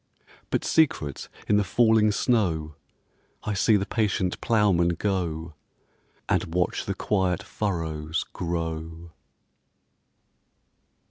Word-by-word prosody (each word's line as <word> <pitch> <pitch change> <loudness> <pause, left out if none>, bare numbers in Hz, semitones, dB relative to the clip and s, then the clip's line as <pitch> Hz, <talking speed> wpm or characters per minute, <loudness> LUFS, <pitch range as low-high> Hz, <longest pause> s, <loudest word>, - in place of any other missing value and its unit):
But - - -1
secret 80 - +1 0.2
in 105 - +4
the 105 - +3
falling 110 +1 +4
snow 90 -10 0 0.7
I 105 - -2
see 105 +2 +3
the 100 - -1
patient 100 -5 -1
ploughman 95 -6 +3
go, 85 -4 -2 0.7
And 80 - 0
watch 90 0 0
the - - -2
quiet 95 -4 0
furrows 80 -5 -2
grow. 80 -1 -4
90 Hz, 95 wpm, -26 LUFS, 80-105 Hz, 0.7 s, in